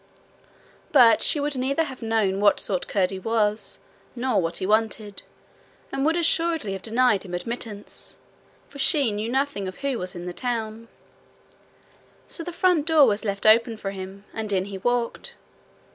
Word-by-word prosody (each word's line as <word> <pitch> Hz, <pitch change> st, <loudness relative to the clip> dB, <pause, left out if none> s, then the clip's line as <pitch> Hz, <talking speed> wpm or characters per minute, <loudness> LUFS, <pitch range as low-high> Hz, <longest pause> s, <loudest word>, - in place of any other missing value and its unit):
But 240 Hz, -7 st, +6 dB
she 300 Hz, -, +1 dB
would 290 Hz, 0 st, -1 dB
neither 270 Hz, +5 st, +1 dB
have 265 Hz, -5 st, -8 dB
known 220 Hz, -4 st, +1 dB
what 205 Hz, 0 st, +4 dB
sort 185 Hz, -3 st, -2 dB
Curdie 190 Hz, -1 st, 0 dB
was, 215 Hz, 0 st, 0 dB, 0.4 s
nor 250 Hz, -4 st, +1 dB
what 165 Hz, 0 st, -2 dB
he -, -, -3 dB
wanted, 215 Hz, -1 st, 0 dB, 0.7 s
and 270 Hz, -, -1 dB
would 320 Hz, +3 st, +2 dB
assuredly 330 Hz, -, +1 dB
have 190 Hz, -, -5 dB
denied 225 Hz, -1 st, +2 dB
him 180 Hz, -3 st, -6 dB
admittance, 215 Hz, +1 st, -6 dB, 0.5 s
for 280 Hz, -, -12 dB
she 280 Hz, -5 st, +3 dB
knew 210 Hz, +2 st, -3 dB
nothing 265 Hz, -6 st, -1 dB
of 185 Hz, -, -8 dB
who 270 Hz, -4 st, 0 dB
was 180 Hz, 0 st, -5 dB
in 175 Hz, 0 st, -7 dB
the 180 Hz, -, -5 dB
tower. 230 Hz, -1 st, -3 dB, 1.4 s
So 335 Hz, -, -6 dB
the 350 Hz, -, -5 dB
front 345 Hz, -3 st, +2 dB
door 315 Hz, -3 st, +6 dB
was 215 Hz, -2 st, +1 dB
left 200 Hz, -2 st, -3 dB
open 225 Hz, +1 st, +5 dB
for 195 Hz, -2 st, -4 dB
him, 195 Hz, +1 st, -8 dB
and 220 Hz, -2 st, -4 dB
in 190 Hz, -1 st, +1 dB
he 195 Hz, -1 st, -7 dB
walked. 245 Hz, +2 st, -2 dB
225 Hz, 165 wpm, -24 LUFS, 200-265 Hz, 1.4 s, But